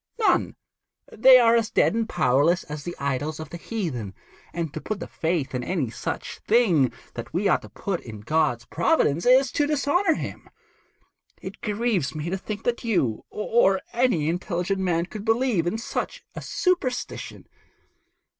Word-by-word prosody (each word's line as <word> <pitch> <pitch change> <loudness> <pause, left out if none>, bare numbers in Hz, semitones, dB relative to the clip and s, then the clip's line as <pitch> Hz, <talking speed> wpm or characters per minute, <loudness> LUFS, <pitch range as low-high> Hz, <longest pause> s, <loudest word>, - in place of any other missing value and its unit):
None. 445 - +2 0.6
They 255 +4 +7
are 235 -2 +5
as 225 -2 +1
dead - - +3
and 225 0 -1
powerless 155 +3 +2
as 150 0 -7
the 175 +2 -5
idols 140 +3 -2
of 155 -1 -8
the 170 - -6
heathen; 155 - -4 0.4
and 165 -3 -4
to 155 - -5
put 215 -2 -4
the - - -5
faith 160 -5 -2
in 125 -1 -2
any 145 -7 -1
such - - -5
thing 190 - +3 0.2
that 120 - -7
we 195 +3 +2
ought 185 - +3
to - - -12
put 190 -4 -3
in 110 -3 -9
God's 125 -1 0
providence, 170 - +1
is 260 0 +5
to 290 +2 +1
dishonour 300 +6 +2
Him. - - -7 0.9
It - - -9
grieves 210 - -1
me 155 +3 -3
to 190 - 0
think 210 +2 -6
that 240 0 -1
you, 140 - 0
or 210 -3 +2
any 235 -11 +2
other 160 - +2
intelligent 180 +1 -2
man, 175 -3 +1
could 205 +2 -8
believe 225 -6 +1
in 215 - -1
such - - -4
a - - -7
superstition.' 350 -9 -2
185 Hz, 170 wpm, -25 LUFS, 155-235 Hz, 0.9 s, They